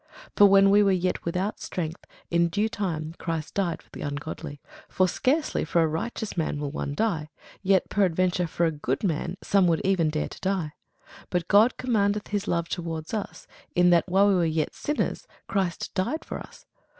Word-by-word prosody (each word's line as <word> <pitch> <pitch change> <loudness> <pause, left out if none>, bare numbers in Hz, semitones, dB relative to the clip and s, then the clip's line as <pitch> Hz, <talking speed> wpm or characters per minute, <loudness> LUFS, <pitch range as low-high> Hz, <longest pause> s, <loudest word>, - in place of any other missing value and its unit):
For 205 - +8
when 195 0 +6
we 205 +1 +6
were 200 -1 +4
yet 185 -1 0
without 180 +5 -2
strength, 165 -2 -4 0.3
in 170 0 +3
due 205 +5 +1
time 170 -8 -3
Christ 165 -2 -3
died 180 -4 -1
for - - -30
the - - -9
ungodly. 145 +1 -5 0.3
For 185 - +2
scarcely 295 - 0
for 165 +1 +2
a - - +2
righteous 215 +7 -4
man 160 -3 -1
will 145 -1 -3
one 145 -1 -4
die: 170 -8 -1 0.3
yet 190 -1 +3
peradventure 185 -2 +1
for 170 +1 0
a 165 - +2
good 150 +6 -3
man 170 0 -1
some 195 -3 +3
would 165 -2 +2
even 185 -5 +2
dare 155 0 -2
to - - -11
die. 185 -6 -1 0.6
But 180 -1 -1
God 215 +5 +5
commendeth 210 -4 0
his 205 -1 -2
love 170 -1 0
toward 165 -1 -5
us, 215 -2 -4 0.3
in 180 -1 +5
that, 170 +1 +3
while 195 +3 +4
we 200 - +4
were 180 -2 +2
yet 160 -1 0
sinners, 295 - -2 0.2
Christ 190 -3 -2
died 245 +13 -2
for - - -5
us. - - -13
180 Hz, 190 wpm, -26 LUFS, 165-200 Hz, 0.6 s, For